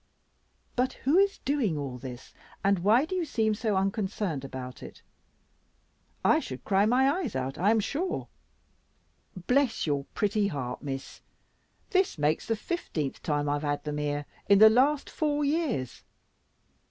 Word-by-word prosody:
But 255 +1 +1
who 295 +8 +2
is 400 0 +3
doing 255 - +1
all 135 -3 -5
this, 125 -1 -9 0.3
and 195 -1 +3
why 220 - +4
do 370 +3 -4
you 365 - 0
seem 220 -8 0
so 215 -1 -1
unconcerned 195 -5 -1
about 130 -2 -7
it? - - -11 1.2
I - - +5
should 130 - -7
cry 200 +1 +3
my 255 +4 +4
eyes 275 - -4
out, 130 +1 -3
I 190 +4 +3
am 225 0 +4
sure." 315 - -2 1.2
"Bless 265 -2 +2
your 140 -3 -1
pretty 210 -1 +1
heart, 140 -8 -4
Miss; 135 -2 -6 0.7
this 375 - +2
makes 150 +1 0
the 225 - +1
fifteenth 190 - -4
time 145 -1 -1
I've 145 0 0
had 145 -1 -2
them 150 -1 -3
here 145 0 -2 0.2
in 200 - +7
the 220 +2 +9
last 275 +5 +3
four 295 -1 0
years. 280 - -1
200 Hz, 155 wpm, -28 LUFS, -, 1.2 s, the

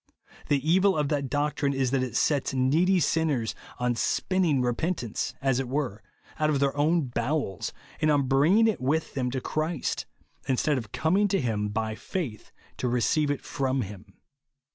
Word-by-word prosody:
The 145 +1 +1
evil 190 +2 +4
of 150 -2 0
that 140 -3 -1
doctrine 145 0 0
is 130 -2 0
that 135 -1 +2
it 130 -1 -3
sets 140 -2 +1
needy 160 +9 +3
sinners 150 -8 +1 0.2
on 125 0 +1
spinning 150 +4 +1
repentance, 125 - -2
as 135 -2 +2
it 130 -2 -3
were, 130 -7 -2 0.4
out 155 0 +2
of 145 -2 +1
their 140 0 +1
own 160 +4 +3
bowels, 120 - -2 0.3
and 155 - +3
on 145 -2 +3
bringing 160 - +4
it 220 - 0
with 150 +5 0
them 125 -2 -1
to 130 +1 -2
Christ, 155 +2 -2 0.4
instead 135 +2 +1
of 110 -4 -10
comkig 195 +6 +2
to 195 - +2
him 110 -5 -1
by 110 +1 -2
faith 130 - -5 0.3
to 125 - -1
receive 125 +5 +1
it 145 - -1
from 135 -1 -1
him. 100 0 -11
140 Hz, 170 wpm, -27 LUFS, 125-155 Hz, 0.4 s, evil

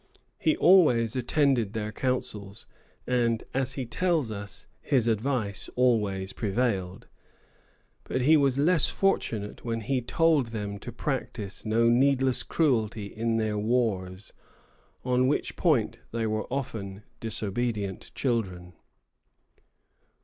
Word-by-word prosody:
He 315 0 +2
always 135 - +5
attended 130 -4 +1
their 110 -1 -3
councils, 110 -4 -3 0.4
and, 120 -2 +1
as 130 -1 -1
he 130 -2 -4
tells 160 -1 0
us, 100 -2 -8 0.2
his 130 -5 +1
advice 115 -2 -1
always 105 -6 +1
prevailed; 100 -4 -1 1.0
but 130 - -2
he 155 +5 +6
was 140 -3 +3
less 155 +2 +3
fortunate 110 - -1
when 115 -1 -2
he 130 +3 -1
told 155 +1 +2
them 105 -3 -5
to 120 - -7
practise 120 -6 -4
no 115 +2 +3
needless 130 +1 +3
cruelty 115 -9 0
in 115 +1 0
their 110 -2 0
wars, 105 -5 -1 0.7
on 125 0 +2
which 145 - -1
point 120 - +1
they 115 0 -1
were 110 +1 -2
often 110 -7 -4 0.2
disobedient 105 -2 -3
children. 95 -9 -2
115 Hz, 115 wpm, -27 LUFS, 105-130 Hz, 1.0 s, he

